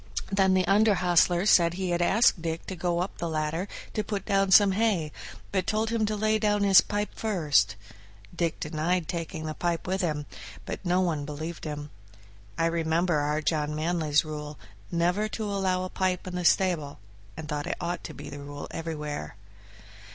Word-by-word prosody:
Then 190 Hz, -1 st, +3 dB
the 185 Hz, -1 st, +2 dB
under 205 Hz, +2 st, +4 dB
hostler 175 Hz, 0 st, +3 dB
said 170 Hz, -4 st, +5 dB
he 185 Hz, -1 st, -2 dB
had 175 Hz, 0 st, +1 dB
asked 195 Hz, 0 st, +4 dB
Dick 165 Hz, 0 st, -3 dB
to 190 Hz, -, -5 dB
go 175 Hz, 0 st, 0 dB
up 185 Hz, -, -5 dB
the 170 Hz, -, -2 dB
ladder 160 Hz, +4 st, -2 dB, 0.3 s
to 215 Hz, -, -1 dB
put 205 Hz, -2 st, -4 dB
down 195 Hz, -2 st, +2 dB
some 200 Hz, +1 st, +7 dB
hay, 190 Hz, -7 st, +1 dB, 0.4 s
but 190 Hz, -2 st, 0 dB
told 220 Hz, +1 st, 0 dB
him 225 Hz, -2 st, +1 dB
to 215 Hz, -, -1 dB
lay 215 Hz, +1 st, +1 dB
down 205 Hz, -1 st, +2 dB
his 195 Hz, -2 st, +7 dB
pipe 205 Hz, 0 st, -3 dB
first. 150 Hz, -, +1 dB, 0.6 s
Dick 170 Hz, -2 st, -1 dB
denied 160 Hz, +3 st, -1 dB
taking 165 Hz, -2 st, -4 dB
the 155 Hz, -, -3 dB
pipe 170 Hz, +1 st, -2 dB
with 190 Hz, +2 st, -1 dB
him, 150 Hz, -4 st, -1 dB, 0.4 s
but -, -, -6 dB
no 180 Hz, 0 st, +2 dB
one 160 Hz, -5 st, 0 dB
believed 155 Hz, +4 st, -6 dB
him. 150 Hz, -1 st, -5 dB, 0.7 s
I 165 Hz, -, +2 dB
remember 165 Hz, 0 st, +1 dB
our 150 Hz, +1 st, -1 dB
John 150 Hz, -1 st, 0 dB
Manly's 155 Hz, -1 st, +1 dB
rule, 150 Hz, -1 st, -6 dB, 0.3 s
never 180 Hz, +5 st, +1 dB
to 220 Hz, +1 st, -5 dB
allow 190 Hz, -2 st, 0 dB
a 185 Hz, -, -4 dB
pipe 185 Hz, -1 st, -1 dB
in 180 Hz, -1 st, -5 dB
the 180 Hz, -1 st, -2 dB
stable, 170 Hz, -6 st, +2 dB, 0.4 s
and 155 Hz, -, -6 dB
thought 150 Hz, -1 st, -3 dB
it -, -, -2 dB
ought 175 Hz, 0 st, -3 dB
to -, -, -7 dB
be -, -, -9 dB
the 145 Hz, 0 st, -7 dB
rule 145 Hz, 0 st, -7 dB
everywhere. 150 Hz, -5 st, -5 dB
175 Hz, 190 wpm, -27 LUFS, 155-195 Hz, 0.7 s, some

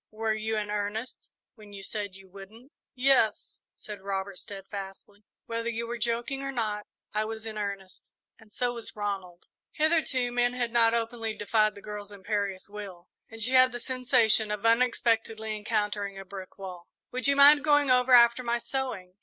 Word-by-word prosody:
Were 220 Hz, 0 st, -1 dB
you 220 Hz, 0 st, -2 dB
in 210 Hz, -1 st, -3 dB
earnest 210 Hz, +3 st, -4 dB, 0.2 s
when 210 Hz, -3 st, -15 dB
you 195 Hz, -1 st, -9 dB
said 200 Hz, -1 st, -5 dB
you 195 Hz, 0 st, -14 dB
wouldn't?" 205 Hz, +8 st, -13 dB, 0.2 s
"Yes," 250 Hz, -5 st, +2 dB, 0.2 s
said 210 Hz, -2 st, -9 dB
Robert, 195 Hz, -1 st, -4 dB
steadfastly; 200 Hz, +1 st, -9 dB, 0.2 s
"whether 230 Hz, 0 st, -3 dB
you 230 Hz, 0 st, -3 dB
were 235 Hz, 0 st, -5 dB
joking 235 Hz, +4 st, -2 dB
or 275 Hz, 0 st, -3 dB
not, 215 Hz, -4 st, -3 dB, 0.3 s
I 215 Hz, +1 st, +1 dB
was 220 Hz, 0 st, -6 dB
in 220 Hz, -1 st, -6 dB
earnest, 200 Hz, -2 st, -6 dB, 0.3 s
and 220 Hz, -2 st, -19 dB
so 245 Hz, +2 st, -1 dB
was 235 Hz, -2 st, -1 dB
Ronald." 195 Hz, -4 st, -4 dB, 0.3 s
Hitherto, 300 Hz, -6 st, +1 dB
men 245 Hz, 0 st, +1 dB
had 240 Hz, -2 st, -2 dB
not 230 Hz, -1 st, +4 dB
openly 225 Hz, -1 st, -2 dB
defied 215 Hz, 0 st, +1 dB
the 200 Hz, -, -12 dB
girl's 210 Hz, -1 st, -7 dB
imperious 200 Hz, -1 st, -3 dB
will, 200 Hz, -4 st, -9 dB, 0.2 s
and 225 Hz, -1 st, -5 dB
she 250 Hz, -, 0 dB
had 255 Hz, 0 st, +6 dB
the 240 Hz, -, -5 dB
sensation 245 Hz, -4 st, +2 dB
of 210 Hz, +1 st, -3 dB
unexpectedly 225 Hz, -2 st, +1 dB
encountering 210 Hz, -2 st, -2 dB
a 195 Hz, -, -8 dB
brick 190 Hz, -1 st, -9 dB
wall. 180 Hz, -3 st, -8 dB, 0.2 s
"Would 255 Hz, +2 st, -1 dB
you 280 Hz, -, +4 dB
mind 285 Hz, +1 st, +8 dB
going 290 Hz, -3 st, +4 dB
over 250 Hz, 0 st, +3 dB
after 235 Hz, 0 st, +7 dB
my 240 Hz, -1 st, 0 dB
sewing?" 235 Hz, -8 st, -4 dB
220 Hz, 175 wpm, -28 LUFS, 205-240 Hz, 0.3 s, mind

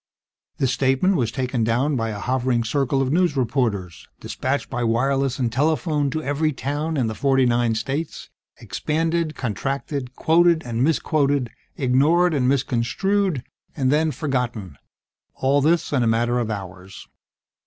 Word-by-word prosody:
This 130 Hz, -2 st, +1 dB
statement 135 Hz, +10 st, +2 dB
was 120 Hz, -8 st, 0 dB
taken 125 Hz, -2 st, -1 dB
down 125 Hz, +6 st, +1 dB
by 115 Hz, -2 st, -1 dB
a 105 Hz, -, -4 dB
hovering 125 Hz, +1 st, 0 dB
circle 135 Hz, +3 st, 0 dB
of 130 Hz, +2 st, -1 dB
news 175 Hz, -4 st, +2 dB
reporters, 110 Hz, -9 st, -1 dB
dispatched 135 Hz, +2 st, -3 dB
by 120 Hz, -2 st, -3 dB
wireless 135 Hz, +3 st, +1 dB
and 125 Hz, -4 st, -1 dB
telephone 150 Hz, +1 st, +1 dB
to 155 Hz, +3 st, -3 dB
every 150 Hz, +2 st, 0 dB
town 145 Hz, +4 st, -3 dB
in 130 Hz, -, +1 dB
the 110 Hz, -, -2 dB
forty 135 Hz, +2 st, +2 dB
nine 120 Hz, -2 st, +2 dB
states, 135 Hz, +8 st, -4 dB, 0.3 s
expanded, 165 Hz, 0 st, -1 dB
contracted, 135 Hz, +2 st, -3 dB
quoted 170 Hz, 0 st, +3 dB
and 120 Hz, 0 st, -1 dB
misquoted, 145 Hz, -4 st, +1 dB, 0.3 s
ignored 155 Hz, +7 st, +3 dB
and 130 Hz, -4 st, +2 dB
misconstrued, 140 Hz, +6 st, 0 dB, 0.3 s
and 130 Hz, -2 st, +1 dB
then 155 Hz, +2 st, +2 dB
forgotten; 125 Hz, -, -3 dB, 0.6 s
all 140 Hz, +2 st, +2 dB
this 160 Hz, +1 st, +1 dB
in 135 Hz, -, +2 dB
a 120 Hz, -, +2 dB
matter 120 Hz, +2 st, +1 dB
of 115 Hz, -2 st, -2 dB
hours. 95 Hz, -2 st, -7 dB
135 Hz, 145 wpm, -22 LUFS, 120-150 Hz, 0.6 s, quoted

